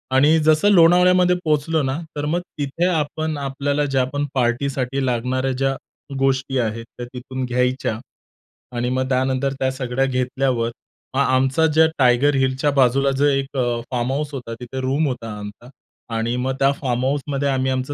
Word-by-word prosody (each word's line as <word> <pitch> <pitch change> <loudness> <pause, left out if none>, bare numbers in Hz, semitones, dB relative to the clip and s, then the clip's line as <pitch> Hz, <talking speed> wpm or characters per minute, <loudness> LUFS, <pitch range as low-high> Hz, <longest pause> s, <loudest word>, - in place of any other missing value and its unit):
आणि 150 +4 +5
जसं 155 +5 +3
लोणावळ्यामध्ये 180 0 +5
पोहोचलो 155 +1 +1
ना, 135 +3 -1 0.2
तर 145 - -3
मग 165 +4 0 0.2
तिथे 145 +5 -1
आपण 155 -2 -1
आपल्याला 140 +1 -1
ज्या 135 -2 +1
पण 145 0 -1
पार्टीसाठी 130 +1 -1
लागणाऱ्या 130 +2 -1
ज्या 135 +1 0 0.4
गोष्टी 135 0 0
आहेत 115 0 -2
त्या 120 - -5
तिथून 130 +1 -5
घ्यायच्या. 125 -2 -1 0.8
आणि 120 +1 -1
मग 130 +1 -1
त्यानंतर 130 +1 0
त्या 130 0 +1
सगळ्या 130 0 -1
घेतल्यावर 130 -2 0 0.5
मग - - +1
आमचा 135 +4 +2
ज्या 160 +1 +4
टायगर 130 +2 +4
हिलच्या 135 +2 +1
बाजूला 135 +1 +3
जो 145 - +3
एक 135 -1 0
अ, 120 -2 0
फार्महाउस 135 +4 -1
होता 125 -4 -6
तिथे 125 +2 -6
रूम 140 +4 +1
होता 125 -3 -4
आमचा 105 +4 -10 0.5
आणि 115 +2 -1
मग 130 +1 -1
त्या 135 0 +4
फार्महाउसमध्ये 135 +2 -1
आम्ही 130 -1 0
आमचं 130 +2 -2
135 Hz, 155 wpm, -21 LUFS, 125-145 Hz, 0.8 s, आणि